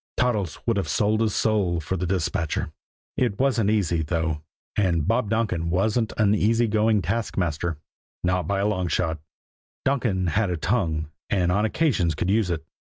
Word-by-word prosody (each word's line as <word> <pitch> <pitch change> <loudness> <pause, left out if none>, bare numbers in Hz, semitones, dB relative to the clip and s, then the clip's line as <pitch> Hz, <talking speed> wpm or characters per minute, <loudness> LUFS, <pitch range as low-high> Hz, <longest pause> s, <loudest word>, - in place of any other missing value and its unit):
Toddles 105 -9 0
would 115 -3 +1
have 100 - -1
sold 110 +1 +1
his 110 -3 +1
soul 100 -6 +1
for 80 +4 -3
the 90 0 -2
dispatcher. 85 -3 -1 0.5
It 120 -6 +1
wasn't 125 -6 +2
easy, 90 -6 +1
though; 80 -1 -1 0.3
and 85 -7 +1
Bob 115 -1 +1
Donkin 105 -7 0
wasn't 110 +6 +1
an 105 -1 +4
easy 115 +3 +3
going 110 -1 +2
taskmaster, 85 -5 -1 0.5
not 90 0 +1
by 100 0 0
long 95 -4 0
odds. 80 -3 -1 0.7
Donkin 120 -9 +1
had 100 +3 +1
a 90 - -1
tongue, 80 -6 -1 0.2
and 90 -3 +2
on 105 +4 +2
occasions 110 - +1
could 95 - 0
use 105 -3 +2
it. 80 -2 -2
100 Hz, 165 wpm, -25 LUFS, 85-110 Hz, 0.7 s, an